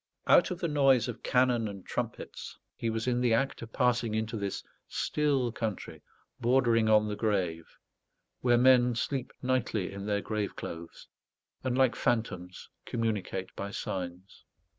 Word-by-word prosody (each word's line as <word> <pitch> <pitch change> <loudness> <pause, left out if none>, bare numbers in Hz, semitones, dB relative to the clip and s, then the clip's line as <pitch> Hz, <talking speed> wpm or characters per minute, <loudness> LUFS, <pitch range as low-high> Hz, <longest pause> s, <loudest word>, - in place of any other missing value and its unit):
Out - - +6
of 180 - -3
the 170 - 0
noise 135 -5 +4
of 120 - -6
cannon 125 -3 +2
and 100 -2 -8
trumpets, - - -5 0.2
he 115 - -2
was 115 0 -2
in 125 -1 +1
the 120 -2 +4
act 135 +4 -1
of 115 -1 -8
passing 120 -3 +1
into 110 +1 -2
this 100 -2 -3 0.2
still 140 -5 0
country 110 -3 -4 0.4
bordering 120 -3 +3
on 105 0 +5
the 105 - -2
grave, 95 -7 -1 0.6
where 120 -1 +3
men 125 -1 +5
sleep 130 +2 -2
nightly 125 -6 0
in 100 +1 -6
their 100 -1 +1
grave 105 -1 -3
clothes, 85 0 -8 0.6
and, 130 -1 0
like 130 -2 +4
phantoms, 95 -7 -2 0.2
communicate 105 -5 -3
by 100 - -4
signs. 90 -1 -6
115 Hz, 150 wpm, -30 LUFS, 100-125 Hz, 0.6 s, Out